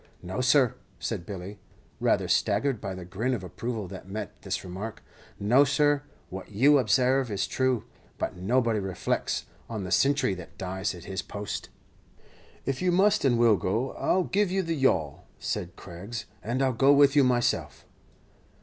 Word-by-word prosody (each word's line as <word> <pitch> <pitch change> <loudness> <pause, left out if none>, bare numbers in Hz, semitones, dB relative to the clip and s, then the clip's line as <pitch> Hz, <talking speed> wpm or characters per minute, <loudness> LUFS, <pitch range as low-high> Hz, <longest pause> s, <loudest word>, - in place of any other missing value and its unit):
"No, 95 +7 -3
sir," 130 -2 +4 0.2
said 85 - -4
Billy, 100 +1 -7 0.4
rather - - +2
staggered 135 -6 +1
by 95 -1 -4
the 90 -1 -8
grin 110 +9 -1
of 100 - -6
approval 110 +3 -4
that 95 - -9
met 105 0 -6
this - - -3
remark 95 +5 -6 0.4
"no, 120 +8 +5
sir, 145 0 +2 0.3
what 95 +1 -7
you 140 +8 +5
ob 115 -5 -2
sarve 130 +2 +3
is 100 -2 -1
true; 130 -3 0 0.3
but - - -3
nobody 115 +4 +1
reflects 95 -2 -2 0.2
on 110 -4 -4
the 90 - -5
sintry 135 +3 +3
that 90 - -11
dies 95 +1 -3
at 85 - -11
his 95 0 -4
post." 100 0 -5 1.0
"If 135 -1 -2
you 180 -1 +2
must 200 +4 +3
and 125 -4 +3
will 115 -3 +5
go, 110 +9 -1
I'll 185 - +1
give 200 +2 +1
you 190 +1 0
the 165 -1 -1
yawl," 130 - 0
said 90 0 -4
Craggs; 95 +6 -7 0.2
"and 125 +4 -1
I 135 - +3
'll - - -1
go 135 +4 +5
with 140 0 +5
you 145 - +6
myself." 125 -2 0
115 Hz, 175 wpm, -27 LUFS, 95-135 Hz, 1.0 s, you